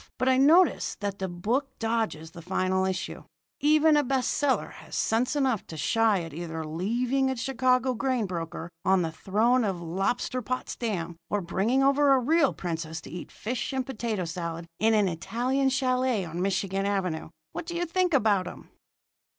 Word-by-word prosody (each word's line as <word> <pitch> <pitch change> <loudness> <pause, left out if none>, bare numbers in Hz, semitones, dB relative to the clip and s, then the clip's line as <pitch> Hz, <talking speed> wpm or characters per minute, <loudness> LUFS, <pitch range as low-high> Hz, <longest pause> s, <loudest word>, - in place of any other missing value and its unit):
But 255 - 0
I 260 - +4
notice 320 +7 +4
that 200 -1 -3
the 190 - -2
book 215 +11 -1
dodges 225 -9 -2
the 170 0 -10
final 185 +2 0
issue. 190 -1 -3 0.4
Even 305 +1 +5
a 295 - +4
best 265 -2 0
seller 285 -2 +1
has - - -10
sense 240 +5 +1
enough 265 -7 0
to 160 - -8
shy 220 +1 +2
at 165 -3 -8
either 160 0 -5
leaving 240 - 0
a 265 - -1
Chicago 255 +1 +1
grain 255 -2 0
broker 170 -2 -5
on 190 -1 +3
the 165 - -2
throne 220 +9 +2
of 195 -3 0
Lobsterpotsdam 195 0 -2
or 205 - 0
bringing 220 +9 +1
over 280 +1 +5
a 265 - +4
real 290 +3 +3
princess 160 -2 -4
to - - -11
eat 175 +1 -7
fish 245 +4 -4
and 260 -1 -1
potato 225 -7 -3
salad 170 0 -4
in 220 +1 +4
an 210 -2 +3
Italian 245 +10 0
chalet 255 -5 +1
on 170 +1 -5
Michigan 195 +1 0
Avenue. 185 -6 -2 0.2
What 335 - -6
do 345 - -4
you 350 +1 0
think 360 +1 +1
about 205 -7 +3
'em?" - - -10
220 Hz, 175 wpm, -27 LUFS, 180-260 Hz, 0.4 s, Even